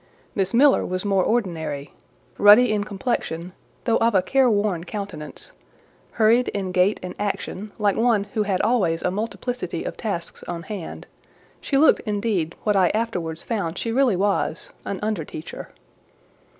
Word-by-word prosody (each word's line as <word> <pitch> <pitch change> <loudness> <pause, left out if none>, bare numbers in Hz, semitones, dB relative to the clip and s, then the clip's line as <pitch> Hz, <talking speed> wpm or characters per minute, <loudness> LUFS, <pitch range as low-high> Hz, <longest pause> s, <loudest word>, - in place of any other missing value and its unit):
Miss 195 -2 0
Miller 270 +4 +5
was 185 +2 -3
more 195 -2 +2
ordinary; 160 -11 -2 0.5
ruddy 215 +3 +7
in 210 -1 +1
complexion, 190 -5 -3 0.3
though 230 -1 +2
of 230 -2 +2
a 185 - +4
careworn 210 -8 +2
countenance; 185 -6 -7 0.6
hurried 230 +2 +4
in 195 -2 -3
gait 185 +3 +2
and 180 - -5
action, 205 0 -3
like 205 -2 +2
one 225 -3 +3
who 215 - +1
had 200 -3 0
always 200 -8 +1
a 180 - +1
multiplicity 220 -2 -3
of - - -5
tasks 175 -7 -4
on 170 -1 -4
hand: 195 -4 -7 0.5
she 275 - 0
looked, 310 +3 +5
indeed, 205 -6 -1
what 210 -1 +2
I 185 -2 +4
afterwards 175 -8 -2
found 200 -7 -2
she 230 - -2
really 250 -3 +3
was, 195 -3 -1
an 200 - -3
under 210 -6 -1
teacher. 155 +2 -8
205 Hz, 150 wpm, -23 LUFS, 180-225 Hz, 0.6 s, ruddy